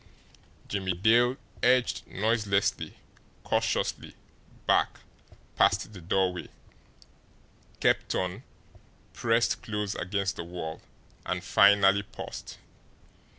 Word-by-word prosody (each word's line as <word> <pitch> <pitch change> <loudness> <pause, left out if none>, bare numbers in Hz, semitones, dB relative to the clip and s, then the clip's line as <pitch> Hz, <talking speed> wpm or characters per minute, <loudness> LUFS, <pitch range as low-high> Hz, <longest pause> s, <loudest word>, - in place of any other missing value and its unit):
Jimmie 95 -2 -2
Dale 120 +7 +4 0.2
edged 125 -1 +2
noiselessly, 105 -1 0 0.5
cautiously - - -1 0.5
back - - +2 0.5
past 110 - +2
the 95 - -10
doorway, 90 +1 0 1.3
kept - - +1
on, 90 -1 -2 0.7
pressed 115 0 +1
close 105 -2 -3
against 100 +1 -2
the - - -4
wall, 85 -2 -6 0.4
and 90 -1 -3
finally 100 +1 +5
paused. 100 - -9
100 Hz, 85 wpm, -28 LUFS, 90-110 Hz, 1.3 s, finally